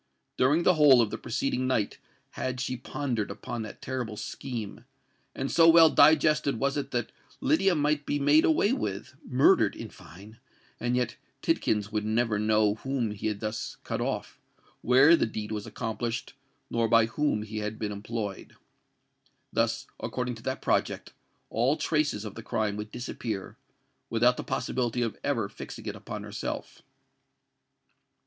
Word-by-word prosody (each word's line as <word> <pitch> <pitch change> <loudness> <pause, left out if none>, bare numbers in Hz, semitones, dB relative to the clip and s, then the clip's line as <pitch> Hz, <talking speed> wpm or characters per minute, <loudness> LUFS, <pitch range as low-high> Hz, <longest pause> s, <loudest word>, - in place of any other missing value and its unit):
During 145 +7 +3
the 180 - +5
whole 145 -5 +7
of 115 -3 +2
the 110 - -3
preceding 130 +2 -1
night 115 -6 0 0.3
had 130 0 -3
she 130 0 -2
pondered 125 -3 -3
upon 120 - -5
that 110 - -8
terrible 125 -5 -4
scheme; 115 -3 -6 0.5
and 135 +1 -3
so 165 0 +6
well 165 -1 +8
digested 155 -4 +4
was 140 0 0
it 145 - -3
that 120 -2 -2 0.3
Lydia 270 - +3
might 150 -1 0
be 145 - +1
made 145 +2 +5
away 200 +8 +3
with—murdered, 125 - +1
in 115 -2 -8
fine—and 110 - -8
yet 125 -2 -1 0.3
Tidkins 105 -1 0
would 105 -1 -1
never 110 0 +1
know 105 -1 +3
whom 135 -5 -1
he 105 +1 -4
had 105 -2 -3
thus 110 0 -4
cut - - -3
off, - - -3 0.4
where 135 +7 +6
the 160 - +1
deed 110 -1 -5
was 105 -1 -4
accomplished, 115 +2 -4 0.4
nor 115 -1 +1
by 115 0 +5
whom 115 -2 0
he 110 0 -5
had 105 +1 -4
been 105 -1 -3
employed. 105 -1 -5 1.0
Thus, - - 0
according 125 -1 -3
to 115 - -11
that 130 - -3
project, - - 0 0.4
all 125 +7 +2
traces 150 -9 0
of 105 - -6
the 115 - -8
crime 105 -1 -1
would 105 +1 -5
disappear, 115 -4 -5 0.5
without 120 +2 +3
the - - -5
possibility 125 -1 -1
of 115 - -4
ever 115 -8 0
fixing - - -9
it - - -4
upon - - -7
herself. - - -6
120 Hz, 155 wpm, -28 LUFS, 110-135 Hz, 1.0 s, well